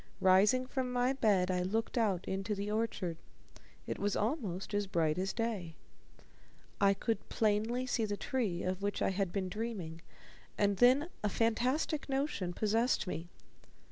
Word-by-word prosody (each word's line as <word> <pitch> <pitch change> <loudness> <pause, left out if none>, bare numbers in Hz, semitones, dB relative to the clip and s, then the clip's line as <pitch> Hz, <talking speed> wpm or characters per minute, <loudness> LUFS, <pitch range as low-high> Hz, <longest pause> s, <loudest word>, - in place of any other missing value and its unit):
Rising 205 +7 +5
from 255 -1 -2
my 250 +1 +2
bed, 200 -8 +2
I 180 0 +1
looked 220 +5 -1
out 205 -6 +1
into 195 +2 -2
the 200 +1 -3
orchard. 210 -6 -1 0.7
It - - -4
was 205 0 0
almost 210 - -2
as 205 -1 0
bright 165 -3 +1
as 190 +1 0
day. 205 -8 -3 1.1
I 200 0 +5
could 225 +3 -2
plainly 220 +4 +1
see 245 -3 0
the 205 -1 -3
tree 210 -11 -1
of 185 +1 -2
which 200 0 -1
I - - +2
had 195 -1 -1
been 190 -1 -1
dreaming, 185 -6 -5 0.6
and 200 -1 +2
then 255 - +5 0.2
a 210 - +2
fantastic 255 - 0
notion 270 -10 -1
possessed 220 +3 +1
me. 170 -2 -5
205 Hz, 155 wpm, -33 LUFS, 185-235 Hz, 1.1 s, Rising